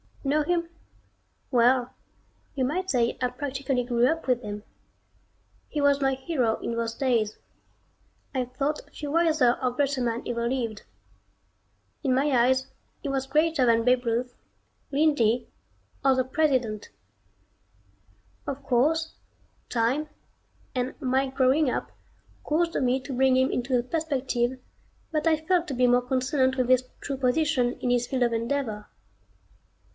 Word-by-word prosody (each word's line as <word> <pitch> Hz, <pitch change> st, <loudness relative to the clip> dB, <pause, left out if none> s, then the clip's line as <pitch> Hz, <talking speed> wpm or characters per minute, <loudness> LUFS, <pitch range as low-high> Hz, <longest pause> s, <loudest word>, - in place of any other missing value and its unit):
Know 295 Hz, +2 st, +2 dB
him? 340 Hz, +1 st, 0 dB, 0.8 s
Well 250 Hz, 0 st, +3 dB, 0.6 s
you 265 Hz, -, 0 dB
might 365 Hz, +8 st, -1 dB
say 240 Hz, -5 st, +1 dB
I 250 Hz, -, +3 dB
practically 270 Hz, -2 st, -2 dB
grew 240 Hz, 0 st, +2 dB
up 325 Hz, 0 st, -1 dB
with 250 Hz, -1 st, +2 dB
him. 210 Hz, -2 st, -6 dB, 1.0 s
He 300 Hz, -, -4 dB
was 285 Hz, 0 st, +3 dB
my 270 Hz, 0 st, +2 dB
hero 260 Hz, -4 st, 0 dB
in 235 Hz, -, -3 dB
those 230 Hz, 0 st, -2 dB
days. 230 Hz, -5 st, 0 dB, 1.0 s
I 255 Hz, -2 st, 0 dB
thought 275 Hz, +4 st, -2 dB
few 290 Hz, -1 st, -6 dB
wiser 310 Hz, -7 st, +3 dB
or 255 Hz, -1 st, +1 dB
greater 275 Hz, +1 st, 0 dB
men 235 Hz, -1 st, -1 dB
ever 235 Hz, -1 st, -1 dB
lived. 235 Hz, -4 st, -2 dB, 1.2 s
In 260 Hz, -1 st, +2 dB
my 285 Hz, +3 st, +2 dB
eyes 260 Hz, +1 st, +3 dB, 0.3 s
he 285 Hz, -, -4 dB
was 270 Hz, -1 st, -1 dB
greater 305 Hz, -1 st, +2 dB
than 230 Hz, -1 st, +3 dB
Babe 250 Hz, +1 st, +2 dB
Ruth, 240 Hz, +2 st, -1 dB, 0.6 s
Lindy, 275 Hz, -6 st, +2 dB, 0.6 s
or 270 Hz, -1 st, +5 dB
the 255 Hz, -, +2 dB
President. 255 Hz, -6 st, 0 dB, 1.6 s
Of 280 Hz, 0 st, -4 dB
course, 290 Hz, +5 st, +1 dB, 0.6 s
time, 250 Hz, +6 st, 0 dB, 0.7 s
and 255 Hz, 0 st, -3 dB
my 265 Hz, 0 st, +1 dB
growing 265 Hz, +2 st, +2 dB
up -, -, -3 dB, 0.5 s
caused 335 Hz, +2 st, 0 dB
me 255 Hz, 0 st, +2 dB
to 265 Hz, +2 st, -6 dB
bring 260 Hz, 0 st, +3 dB
him 260 Hz, 0 st, +3 dB
into 250 Hz, +1 st, 0 dB
a 240 Hz, -, 0 dB
perspective 260 Hz, -4 st, -1 dB, 0.5 s
that 310 Hz, 0 st, 0 dB
I 320 Hz, -, +5 dB
felt 355 Hz, 0 st, +2 dB
to 270 Hz, -, -3 dB
be 250 Hz, 0 st, +3 dB
more 245 Hz, 0 st, +4 dB
consonant 260 Hz, +1 st, +1 dB
with 255 Hz, -1 st, 0 dB
his 255 Hz, 0 st, +4 dB, 0.2 s
true 275 Hz, -, -4 dB
position 255 Hz, -1 st, +1 dB
in 245 Hz, -, 0 dB
his 245 Hz, 0 st, +1 dB
field 260 Hz, -2 st, 0 dB
of 240 Hz, -1 st, +1 dB
endeavor. 230 Hz, -3 st, -2 dB
260 Hz, 145 wpm, -26 LUFS, 245-285 Hz, 1.6 s, or